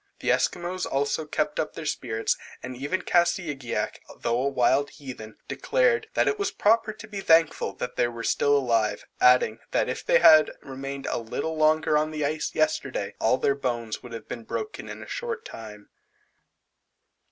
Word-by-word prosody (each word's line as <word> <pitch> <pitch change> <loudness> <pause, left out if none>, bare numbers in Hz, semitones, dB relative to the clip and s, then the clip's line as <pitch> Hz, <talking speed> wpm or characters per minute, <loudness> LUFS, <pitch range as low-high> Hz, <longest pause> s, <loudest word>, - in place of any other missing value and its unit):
The - - +1
Esquimaux 180 +1 0
also 140 +3 0
kept 150 0 -1
up 155 - -2
their 160 - -6
spirits, 115 -6 -1 0.3
and 125 0 -6
even 145 +9 -2
Kassigiak, 160 -7 0 0.2
though 120 +1 +1
a 140 - +1
wild 135 +2 +2
heathen, 130 -7 -9
declared; - - +1
that - - +3
it 420 - +1
was 400 -1 0
proper 225 - +2
to 215 +1 -11
be 205 -2 -6
thankful 165 -3 +3
that 125 - -6
they 120 - +3
were 115 -1 -7
still 145 0 +3
alive; 115 -6 0
adding, 125 -3 +5
that - - +1
if - - -4
they - - +4
had 155 - +7
remained 135 0 -6
a - - -1
little 140 +8 -3
longer 155 -1 +3
on 155 +1 0
the 155 -2 -2
ice 155 +1 -2
yesterday 135 -8 0
all 115 +3 +3
their 140 - +2
bones 120 -5 -3
would 120 -1 -10
have 115 - -8
been 115 - -6
broken 430 - -5
in - - -7
a - - -12
short 475 -2 -4
time. 105 -2 -10
145 Hz, 175 wpm, -26 LUFS, 125-175 Hz, 0.3 s, had